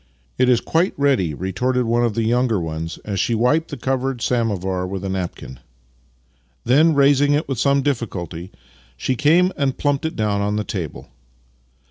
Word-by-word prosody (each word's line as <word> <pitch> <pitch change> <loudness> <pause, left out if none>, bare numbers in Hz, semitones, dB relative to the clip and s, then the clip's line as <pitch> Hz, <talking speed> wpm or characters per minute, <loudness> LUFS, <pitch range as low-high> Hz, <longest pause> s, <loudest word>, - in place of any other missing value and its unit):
" 60 - -39
" - - -40
It 130 - +4
is 120 -2 +4
quite 170 +4 0
ready," 130 - +1
retorted 125 - -1
one 120 +1 +1
of 115 -3 0
the 115 - 0
younger 120 +1 +1
Master 85 - -3
and 80 - -4
Man 80 +1 -4
27 85 - -10
ones 105 - -4
as 95 - -1
she 115 - +1
wiped 135 +8 +2
the 145 - -6
covered 130 0 -2
samovar 95 -6 -1
with 95 0 -5
a - - -2
napkin. 90 -8 -5 1.0
Then, 150 +6 +4
raising 145 +1 +4
it 150 - -1
with 135 -5 -3
some 140 +1 +2
difficulty, 95 - -3 0.5
she 130 - -1
came 165 +7 +3
and 135 -2 -1
plumped 145 0 0
it 160 - -3
dowTi 105 -2 0
on 105 +1 -1
the 105 - -1
table. 90 -8 -6
120 Hz, 200 wpm, -21 LUFS, 95-140 Hz, 1.0 s, It